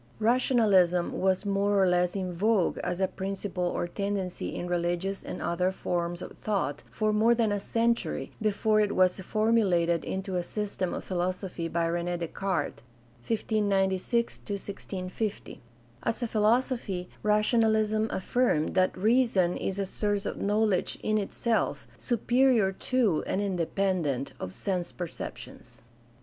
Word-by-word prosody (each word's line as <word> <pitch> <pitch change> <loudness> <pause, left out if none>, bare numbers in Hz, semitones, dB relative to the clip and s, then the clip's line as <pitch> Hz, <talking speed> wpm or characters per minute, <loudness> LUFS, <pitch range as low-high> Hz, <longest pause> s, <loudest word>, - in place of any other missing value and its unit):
Rationalism 215 -7 +3
was 190 +1 +1
more 200 0 +2
or 190 - +5
less 180 0 +2
in 185 -2 -2
vogue 200 +1 +2
as 180 - -2
a 190 - +2
principle 190 -1 -3
or 175 - -1
tendency 195 0 -3
in - - -3
religious 175 +2 -1
and - - -6
other 180 +2 +1
forms 175 -2 -2
of - - -9
thought 195 -9 -1
for 215 -1 0
more 225 +3 +4
than 225 -3 +1
a 205 - 0
century 230 +3 0
before 215 0 +2
it 205 -1 0
was 185 +1 +3
formulated 190 -5 +2
into 190 -1 -3
a - - +1
system 200 -1 -3
of - - -5
philosophy 180 -1 -2
by 165 +1 0
Rene 175 +1 -1
Descartes 170 -1 -2 0.2
( 120 0 -27
1 225 - +2
596 205 +2 0
1650). 200 0 -5 0.4
As 235 - -1
a - - 0
philosophy, 220 -4 +1
rationalism 215 0 +2
affirmed 190 -5 +1
that 185 0 +2
"reason 215 -4 +3
is 195 - -3
a 200 - 0
source 205 +1 -1
of - - -4
knowledge 210 -2 +1
in 215 0 +2
itself, 225 +3 -1
superior 240 -3 +3
to 215 -4 +1
and - - 0
independent 180 -7 -1
of 95 - -5
sense 180 - -2
perceptions." 175 -2 -8
195 Hz, 140 wpm, -28 LUFS, 180-215 Hz, 0.4 s, or